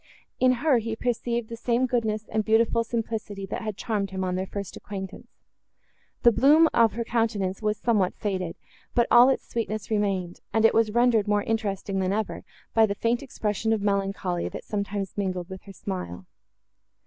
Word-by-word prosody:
In 255 0 +5
her 275 -6 +5
he 225 0 -3
perceived 235 -1 -1
the 230 - -6
same 240 +2 +1
goodness 220 -4 -1
and 220 0 0
beautiful 225 +1 +3
simplicity, 220 -4 -4
that - - -5
had 215 -3 -4
charmed 210 -5 -2
him, 190 0 -3
on 180 -1 -1
their 185 +1 -2
first 200 -1 -6
acquaintance. 195 -2 -7 1.0
The 240 - +8
bloom 290 +8 +6
of 230 -2 +4
her 235 +2 -2
countenance 220 -5 -1
was 215 0 0
somewhat 210 -6 +1
faded, 185 -5 -3 0.4
but 235 - +4
all 240 +2 +8
its 265 - -1
sweetness 215 -2 -3
remained, 195 -4 -1
and 220 +1 +3
it - - +6
was 225 -1 +3
rendered 235 -2 +3
more 205 0 +2
interesting, 200 -3 -2
than 190 0 0
ever, 215 0 -3 0.3
by 225 -1 +5
the 200 - -2
faint 235 +3 0
expression 220 -4 -1
of 215 -2 -1
melancholy, 195 -3 -1
that - - -7
sometimes 200 -1 -3
mingled 185 -2 -2
with 190 0 -8
her 195 - -10
smile. 95 - -6
215 Hz, 180 wpm, -26 LUFS, 195-230 Hz, 1.0 s, The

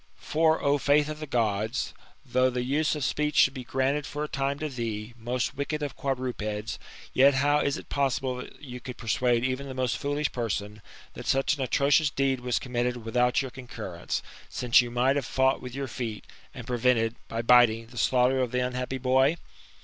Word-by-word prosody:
For, 160 +1 +2
O 145 0 +3
faith 145 +2 +3
of 155 0 -5
the 155 - -6
Gods! 110 -1 -1 0.3
though 130 0 +2
the 125 -1 -2
use 150 +5 +1
of 150 - -3
speech 150 +3 0
should 135 - +5
be 130 -2 -6
granted 135 +3 0
for 145 0 -4
a - - -2
time 140 0 -1
to 155 - -3
thee, 115 -4 -4
most 120 +1 -2
wicked 150 +2 -3
of 145 - -4
quadrupeds, 120 -6 -3 0.3
yet 135 +1 +5
how 145 +2 +3
is 140 - 0
it - - -10
possible 130 -2 -1 0.2
you 125 -4 -8
could 125 -1 -8
persuade 120 +1 +1
even 130 +2 -2
the 130 - -7
most 130 -1 -1
foolish 145 +1 -1
person, 105 -3 -3 0.3
that - - -8
such 135 +3 +2
an 140 - -6
atrocious 140 +3 +3
deed 135 -1 0
was 125 -1 -1
committed 120 -2 -2
without 125 +3 +2
your 130 - -6
concurrence, 110 -9 -5 0.3
since 120 -1 +4
you 120 - -4
might 125 +3 +2
have 140 - -1
fought 130 0 +2
with 125 0 -8
your 135 0 -3
feet, 115 -3 -5 0.3
and - - -9
prevented, 120 -2 +2
by 115 +1 -3
biting, 115 -2 +5
the 120 +2 -16
slaughter 130 +1 +3
of 125 -2 +1
the 125 - 0
unhappy 125 +1 -3
boy 130 +4 +3
130 Hz, 195 wpm, -27 LUFS, 120-140 Hz, 0.3 s, should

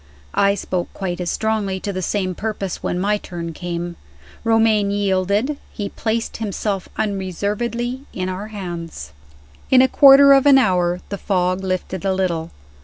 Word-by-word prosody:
I 200 0 +3
spoke 180 -2 -3
quite 180 -2 -3
as 175 - -2
strongly, 215 -3 -1
to 200 - -3
the 185 - -3
same 185 0 -1
purpose, 200 -1 -4
when - - -2
my 205 +3 +1
turn 170 -3 -6
came. 175 +1 -5 0.5
Romayne 225 -2 +3
yielded 200 +7 0
he 205 -2 -4
placed 225 +2 -2
himself 200 -2 -3
unreservedly 220 +6 -2
in 185 0 -3
our 185 +3 -4
hands. 170 - -7 0.6
In 260 - +6
a - - +5
quarter 280 +1 +8
of 275 +1 +4
an 275 -1 +8
hour 180 -7 +2
the 200 - -4
fog 185 -1 0
lifted 185 0 -3
a 190 -1 +1
little. 170 -4 -1
195 Hz, 155 wpm, -20 LUFS, 180-220 Hz, 0.6 s, quarter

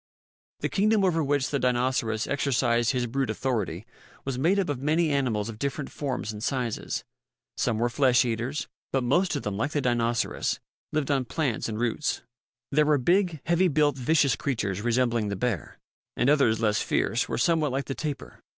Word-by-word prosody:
The - - 0
kingdom 210 +1 +2
over 165 -3 +2
which 140 -1 0
the 140 - +1
Dinoceras 125 -3 +1
exercised 120 -4 +1
his 125 -2 +1
brute 130 +1 -1
authority 110 -5 -2 0.4
was 135 -2 -2
made 175 +8 +3
up 195 - +1
of 135 -3 -2
many 155 +2 +2
animals 120 -7 0
of 110 -2 -7
different 140 +1 -3
forms 130 -6 -3
and 105 0 -7
sizes. 125 -5 -2 0.5
Some 115 -3 0
were 120 +2 +2
flesh 125 0 +3
eaters, 120 +5 -2 0.2
but 135 -1 +1
most 175 +8 +2
of 145 - -3
them, 100 -1 -3
like 140 +7 -1
the 145 - +1
Dinoceras, 120 -2 0 0.3
lived 150 -2 0
on 135 -2 +1
plants 125 -3 -1
and 110 0 -4
roots. 120 +5 -1 0.5
There 150 +1 +3
were 150 -1 +4
big, 175 +2 +2
heavily 175 +2 +3
built, 150 -3 +2
vicious 140 0 +2
creatures 105 - -2
resembling 120 -1 +1
the 100 - -2
bear; 100 - -3 0.4
and 125 +4 +3
others, 125 -7 +3
less 105 -2 +2
fierce, - - 0
were - - -1
somewhat 155 +2 +2
like 135 +2 -2
the 135 - -3
tapir. 145 0 -5
130 Hz, 180 wpm, -27 LUFS, 115-150 Hz, 0.5 s, were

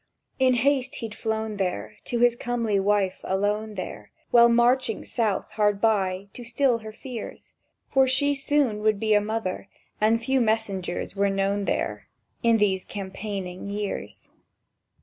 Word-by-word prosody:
In 260 -1 +4
haste 265 +1 +1
he'd 225 -3 -6
flown 220 -1 -3
there 185 -2 -3
To 240 - -1
his 240 -1 +5
comely 235 -4 -1
wife 195 -1 +1
alone 205 +3 -1
there, 185 - -7 0.2
While 235 0 +7
marching 240 0 +2
south 220 -5 -1
hard 205 -2 +1
by, 195 -3 +1
to 245 - -9
still 245 0 +1
her 220 -1 -8
fears, 235 0 -8 0.4
For 265 -1 +4
she 285 +2 +3
soon 275 -6 +1
would 215 -1 +2
be 215 0 +2
a 205 - +5
mother, 210 -3 -3 0.3
and 220 +2 +4
few 265 +3 +1
messengers 210 -6 -1
were 200 0 +2
known 195 +1 0
there - - -2 0.3
In 230 -2 +4
these 190 -3 +1
campaigning 195 -1 -6
years. 205 0 -5
220 Hz, 150 wpm, -25 LUFS, 200-240 Hz, 0.4 s, While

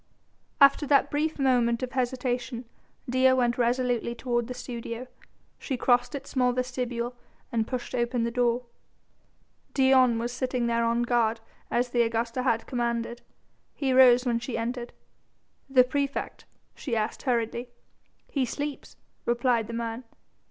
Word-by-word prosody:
After 280 +1 +6
that 280 -1 +3
brief 310 +2 0
moment 245 -3 +2
of 255 - -3
hesitation 250 -1 -2 0.4
Dea 260 +1 +4
went 245 -1 +1
resolutely 240 -1 +1
toward 240 -1 -1
the 250 - -6
studio. 240 -1 -6 0.5
She 265 - -3
crossed 245 +3 +2
its 275 -1 -7
small 250 -2 +2
vestibule 250 -1 -3 0.4
and 225 -1 0
pushed 255 -1 -4
open 240 -1 0
the 235 - -1
door. 245 0 +1 1.1
Dion 260 -3 +5
was 235 +1 -2
sitting 250 -1 -1
there 235 0 +1
on 235 +1 +1
guard 235 -2 +1 0.3
as 245 +1 0
the 240 0 +2
Augusta 230 +2 0
had 230 -3 +1
commanded. 235 -1 -2 0.5
He 270 -3 0
rose 250 -1 +7
when 235 -2 +1
she 240 0 -4
entered. 240 +1 -3 0.8
"The 260 -2 +6
praefect?" 280 +2 -3 0.3
she 245 -5 -4
asked 215 -1 -2
hurriedly. 240 -1 -1 0.6
"He 275 - -1
sleeps," 285 +3 -5 0.3
replied 240 -2 +2
the 230 - -7
man. 230 +1 -4
245 Hz, 140 wpm, -27 LUFS, 235-255 Hz, 1.1 s, rose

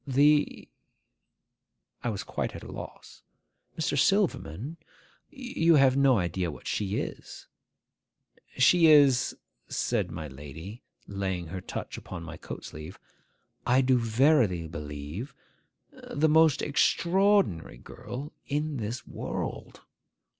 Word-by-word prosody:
'The—?' 145 +3 +3 1.4
I 120 - 0
was 105 -4 -3
quite - - -4
at - - -8
a - - -9
loss. - - -10 0.6
'Mr. 155 -3 0
Silverman, 165 - 0 0.5
you 240 - +1
have 135 -2 +5
no 135 -3 +4
idea 90 -1 -1
what 75 - -10
she 100 -1 -1
is. - - -7 1.1
She 165 +6 +6
is,' 140 -5 +5 0.3
said - - -1
my 80 - -6
lady, 75 - -9 0.2
laying 95 -3 -3
her 95 +1 -5
touch - - -6
upon 90 -3 -8
my 85 0 -8
coat - - -8
sleeve, 80 +3 -9 0.7
'I 125 +2 +5
do 130 -1 +3
verily 115 - +3
believe, 75 - -7 0.7
the 155 +2 +2
most 160 -1 +4
extraordinary 170 - +2
girl 135 - -8
in 150 0 -1
this 115 +2 -4
world. - - -5
125 Hz, 115 wpm, -28 LUFS, 90-150 Hz, 1.4 s, She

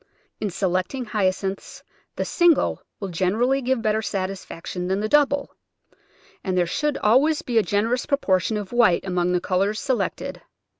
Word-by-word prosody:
In 210 - -1
selecting 185 +7 -1
Hyacinths 195 -2 -2 0.3
the - - -2
single 345 -4 +3 0.2
will 195 - -4
generally 220 +10 +1
give 255 -2 0
better 215 0 +1
satis 195 -2 -3
faction 180 +2 -6
than 190 +1 0
the 215 - -1
double, 285 +1 +2 0.9
and 185 -2 -1
there 175 - +3
should 295 - -1
always 275 +8 +3
be 235 -2 +2
a - - +4
generous 215 +6 0
proportion 210 -6 +1
of 205 +1 -6
white 225 -9 +4
among 180 -1 0
the 180 - +2
colours 195 +4 0
se 265 - 0
lected. - - -3
210 Hz, 160 wpm, -23 LUFS, 185-250 Hz, 0.9 s, a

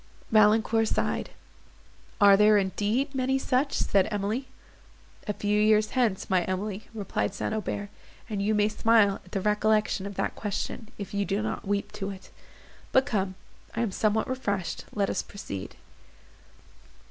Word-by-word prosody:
Valancourt 220 +1 +4
sighed. - - -1 0.9
"Are 200 -2 +8
there, 210 +1 +6
indeed, 210 +8 0
many 265 0 +1
such?" 265 +1 0
said 195 -1 +2
Emily. 215 +5 -2 0.8
"A 210 - 0
few 210 +1 +1
years 215 0 +4
hence, 235 -7 0
my 185 -2 +3
Emily," 195 +2 -3
replied 205 -2 -2
St. - - -2
Aubert, 205 -1 -3 0.4
"and 210 -4 -3
you 215 +2 +1
may 210 0 +3
smile 215 -2 +3
at 180 - -19
the 195 - -1
recollection 210 -1 +1
of 200 - -8
that - - -1
question—if 210 0 -5
you 200 0 +1
do 200 +2 -1
not 215 - -4
weep 200 0 -1
to 195 -1 -5
it. 190 -1 -10 0.6
But 265 0 +4
come, 190 -3 -1 0.4
I 225 - 0
am 225 -4 0
somewhat 215 +2 +1
refreshed, 200 -8 -3
let 200 -2 0
us - - -1
proceed." 100 - -7
210 Hz, 150 wpm, -27 LUFS, 200-220 Hz, 0.9 s, Are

